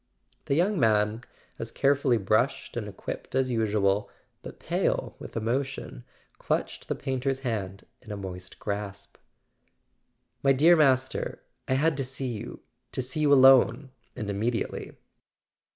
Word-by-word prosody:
The 140 - +1
young 185 +4 +2
man, 110 0 +2 0.4
as - - -4
carefully 140 -3 +2
brushed 110 +6 0
and 115 -3 -3
equipped 100 +5 -7
as 130 -1 +2
usual, 105 -3 +1 0.3
but - - -10
pale - - -1
with - - -8
emotion, 125 - -3 0.3
clutched - - -2
the - - -1
painter's 135 0 -2
hand 100 -7 -4 0.2
in 115 - -11
a 105 - -4
moist 90 -2 -7
grasp. 100 -1 -5 1.2
"My 135 0 +4
dear 160 +6 +6
Master, 130 -4 +1 0.2
I 130 - +2
had 155 +3 +2
to 135 - 0
see 130 0 -2
you—to 105 +4 -10
see 130 +5 -2
you 150 -2 +3
alone 130 -1 +6 0.2
and 110 -5 -5
immediately." 110 +4 -2
125 Hz, 135 wpm, -27 LUFS, 105-135 Hz, 1.2 s, dear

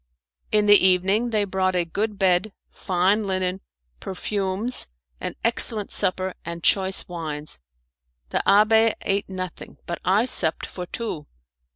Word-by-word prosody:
In 210 -1 +3
the 205 -1 +6
evening 190 +5 +3
they 215 -2 +1
brought 190 -1 -1
a 175 -1 +1
good 205 +5 -3
bed, 190 +1 +1 0.2
fine 190 +3 +1
linen, 185 -1 -2 0.4
perfumes, 195 +4 -3 0.3
an - - -5
excellent 225 -2 +1
supper, 185 -1 0
and 170 0 -6
choice 190 -1 +3
wines. 155 - -6 0.7
The - - 0
abbé 220 +2 +5
ate 200 0 -1
nothing, 185 -1 -7
but 170 - -5
I 200 +6 +3
supped 165 -10 +2
for 180 -1 -7
two. 180 -11 -5
190 Hz, 135 wpm, -23 LUFS, 180-210 Hz, 0.7 s, the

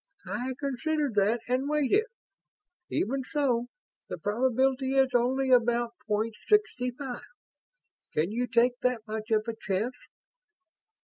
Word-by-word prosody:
"I 255 +1 -3
considered 290 0 -1
that 210 +3 +2
and 255 +3 0
weighted 300 +6 +3
it. 445 - -4 0.8
Even 265 +6 0
so, 255 -4 0 0.4
the - - -4
probability 260 - +1
is 265 -1 +3
only 260 +2 +2
about 240 -1 +3
point 215 +2 0
sixty 410 -12 +2
five. 250 0 -6 0.9
Can 160 +6 0
you 245 +3 -1
take 245 +1 +3
that 250 -3 0
much 220 0 -5
of 215 0 +2
a 230 - -1
chance?" 195 +6 -1
245 Hz, 130 wpm, -28 LUFS, 225-265 Hz, 0.9 s, weighted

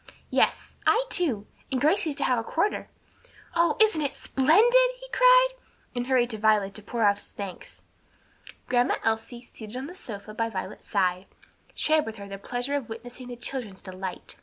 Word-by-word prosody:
"Yes; - - +1
I 475 +3 +4
too; 260 - +1 0.3
and 260 - +1
Gracie's 310 +1 +2
to 285 - -2
have 250 -2 +2
a - - -3
quarter." 335 - -1 0.7
"Oh, 335 -2 +3
isn't 435 -8 +5
it 285 - -1
splendid!" 460 - +4
he - - -10
cried, - - +6 0.5
and 245 0 -2
hurried 250 -2 +2
to 220 - -4
Violet 210 -2 +3
to 215 - -6
pour 230 +2 -2
out 205 -1 +4
his - - -10
thanks. 195 -3 -8 0.8
Grandma 245 0 +2
Elsie, 225 +2 -1
seated 220 -1 -9
on 260 - -4
the 340 - -8
sofa 215 - -7
by 230 +1 -1
Violet's - - -6
side, 185 -2 +1 0.5
shared 310 -3 +2
with 220 - -5
her 200 -2 -9
the 195 0 -7
pleasure 245 +6 -2
of 270 -6 -3
witnessing 245 +3 -8
the 245 - -6
children's 235 -5 -4
delight. 185 -1 -7
245 Hz, 180 wpm, -27 LUFS, 215-305 Hz, 0.8 s, cried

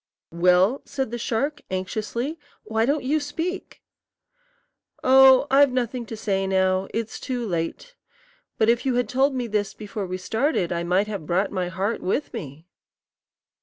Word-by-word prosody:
"Well?" 180 +8 +3
said 265 -5 -4
the 240 - -4
shark, 260 +7 -1
anxiously; 220 - -3 0.2
"why 220 +1 0
don't 290 +1 +1
you 295 +4 +1
speak?" 330 +6 -5 1.2
"Oh, 265 0 +7
I've 280 0 +6
nothing 250 -1 -2
to 225 - -6
say 195 -3 -1
now. 190 0 +1
It's 225 0 -4
too 250 -3 -3
late. 175 - -4 0.6
But 220 - +3
if 235 +1 +3
you 260 -2 0
had 245 0 +1
told 265 +2 +1
me 250 -2 -1
this 210 -3 -2
before 205 -2 -5
we 185 +1 -3
started, 220 - 0
I 170 -1 -1
might 180 +4 +1
have 200 -7 -6
brought 190 +3 +1
my 185 -2 -2
heart 190 +5 -2
with 260 +11 -2
me." 155 - -8
225 Hz, 160 wpm, -24 LUFS, 190-265 Hz, 1.2 s, Oh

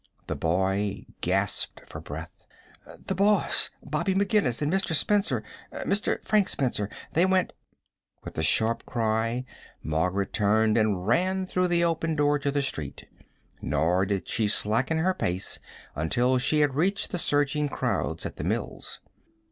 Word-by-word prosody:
The - - -3
boy 95 +4 0
gasped 95 +3 0
for - - -9
breath. - - -9 0.6
"The - - -1
boss, 205 +2 +3
Bobby 190 -2 -1
McGinnis 195 - +2
an' 150 +1 0
Mr. 190 -3 +1
Spencer 155 - +1 0.3
Mr. 200 +1 -1
Frank 210 -3 +3
Spencer. 120 -7 -1 0.2
They 170 - +4
went 185 -1 +1 0.3
" - - -48
With - - -8
a - - -1
sharp 110 +8 +2
cry 115 +1 0 0.4
Margaret 90 +5 -1
turned 110 +1 +3
and 105 -5 +1
ran 185 - +1
through 185 0 0
the 170 -1 +2
open 165 -1 0
door 145 0 +2
to 140 - -1
the 140 0 0
street, 75 - -4 0.5
nor 90 +4 +1
did 100 -2 -2
she 110 -3 +1
slacken 115 +9 +1
her 180 +4 +2
pace 90 - -2 0.3
until 120 - +1
she 150 +4 +2
had 145 -2 +2
reached 185 +8 0
the 180 - -2
surging 145 -1 +1
crowds - - -2
at - - -6
the - - -4
mills. - - -3
130 Hz, 150 wpm, -27 LUFS, 100-170 Hz, 0.6 s, They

